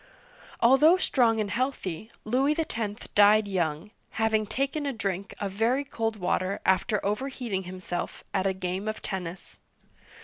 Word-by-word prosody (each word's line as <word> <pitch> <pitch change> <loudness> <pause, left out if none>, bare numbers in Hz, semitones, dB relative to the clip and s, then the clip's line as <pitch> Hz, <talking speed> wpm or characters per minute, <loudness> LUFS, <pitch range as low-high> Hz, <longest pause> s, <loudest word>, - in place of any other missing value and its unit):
Although 280 +9 +6
strong 235 -10 +2
and 205 -2 -1
healthy, 220 -7 -2 0.2
Louis 270 +7 +2
X. 225 -10 -3
died 210 +1 +6
young, 175 0 -2 0.3
having 220 -1 +2
taken 275 +6 -1
a 275 - -1
drink 195 -3 -3
of 200 -2 -2
very 230 +7 +1
cold 225 -5 -2
water 185 0 -1
after 200 +3 +2
overheating 220 -3 -2
himself 180 -1 -5
at 195 -1 +1
a 190 - +1
game 185 +2 -3
of 215 - -4
tennis. 180 -2 -6
215 Hz, 140 wpm, -27 LUFS, 190-245 Hz, 0.3 s, Although